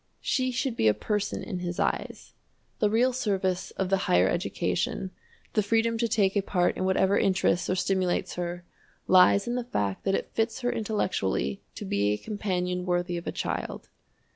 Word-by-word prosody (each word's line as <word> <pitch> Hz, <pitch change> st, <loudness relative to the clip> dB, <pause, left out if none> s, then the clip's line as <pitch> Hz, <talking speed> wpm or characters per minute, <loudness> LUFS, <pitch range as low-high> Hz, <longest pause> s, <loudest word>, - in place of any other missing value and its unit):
She 255 Hz, -1 st, +1 dB
should 255 Hz, 0 st, -1 dB
be 110 Hz, -, +2 dB
a 105 Hz, -, +4 dB
person 210 Hz, -2 st, -2 dB
in 185 Hz, -5 st, -4 dB
his 175 Hz, 0 st, -4 dB
eyes. -, -, -2 dB, 0.5 s
The 210 Hz, -, +3 dB
real 245 Hz, +4 st, +3 dB
service 190 Hz, -6 st, -1 dB
of 190 Hz, -1 st, -1 dB
the 195 Hz, -, +4 dB
"higher 90 Hz, +1 st, +5 dB
education," 185 Hz, -, -1 dB, 0.4 s
the 215 Hz, -, +3 dB
freedom 225 Hz, +2 st, +1 dB
to 235 Hz, -, +2 dB
take 200 Hz, -3 st, +2 dB
a 200 Hz, -, +3 dB
part 180 Hz, -2 st, +1 dB
in 185 Hz, -, -2 dB
whatever 190 Hz, +1 st, +3 dB
interests 180 Hz, -2 st, +2 dB
or 185 Hz, -, +2 dB
stimulates 185 Hz, -1 st, 0 dB
her 175 Hz, 0 st, -4 dB, 0.4 s
lies 185 Hz, +3 st, +5 dB
in 240 Hz, -, -1 dB
the 250 Hz, 0 st, -1 dB
fact 100 Hz, -, -2 dB
that 195 Hz, 0 st, +2 dB
it -, -, -3 dB
fits 225 Hz, +3 st, -1 dB
her 245 Hz, 0 st, +1 dB
intellectually 185 Hz, -, -1 dB
to -, -, -6 dB
be 100 Hz, +1 st, +1 dB
a -, -, -1 dB
companion 180 Hz, -, -2 dB
worthy 175 Hz, 0 st, 0 dB
of 170 Hz, -, -5 dB
a -, -, 0 dB
child. -, -, -4 dB
190 Hz, 185 wpm, -27 LUFS, 175-220 Hz, 0.5 s, higher